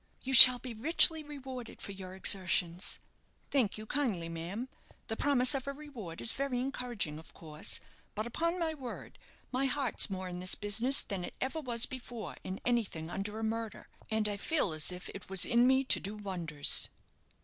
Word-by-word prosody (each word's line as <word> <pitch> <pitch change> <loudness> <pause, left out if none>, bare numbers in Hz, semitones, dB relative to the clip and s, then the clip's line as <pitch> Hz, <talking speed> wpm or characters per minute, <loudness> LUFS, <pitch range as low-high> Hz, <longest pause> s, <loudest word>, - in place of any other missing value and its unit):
"You 265 - -3
shall 255 0 +11
be 245 -1 -8
richly 320 +6 +3
rewarded 265 -5 -9
for - - -7
your 190 -1 -9
exertions." 185 -2 +2 0.5
"Thank 245 -9 +1
you 215 - -8
kindly, 215 -11 -2
ma'am. 175 +9 -6 0.4
The 225 - -2
promise 265 +1 +5
of 270 -1 -4
a 280 - -3
reward 255 - -9
is 225 - +2
very 275 -2 -2
encouraging, 245 - -4
of 160 - -15
course; 155 -2 -1 0.4
but, 215 +2 -3
upon 335 +9 -2
my 330 -2 -1
word, 265 -5 -9 0.3
my 265 +1 0
heart's 270 -3 0
more 190 -1 -5
in 180 0 -7
this 185 0 0
business 225 +6 +4
than 195 -3 -5
it - - -8
ever 290 +5 -3
was 240 -4 +3
before 245 -3 -8
in 185 +1 -6
anything 200 -9 -2
under 205 +3 -4
a 225 - -5
murder; 225 0 -4 0.2
and 220 -1 0
I 205 -1 -3
feel 250 - 0
as 155 +3 +1
if 180 +1 -8
it 195 - -11
was 190 -2 +4
in 240 0 +3
me 265 +1 +3
to 260 - +3
do 200 +3 -7
wonders." 175 -8 +1
225 Hz, 185 wpm, -31 LUFS, 190-260 Hz, 0.5 s, shall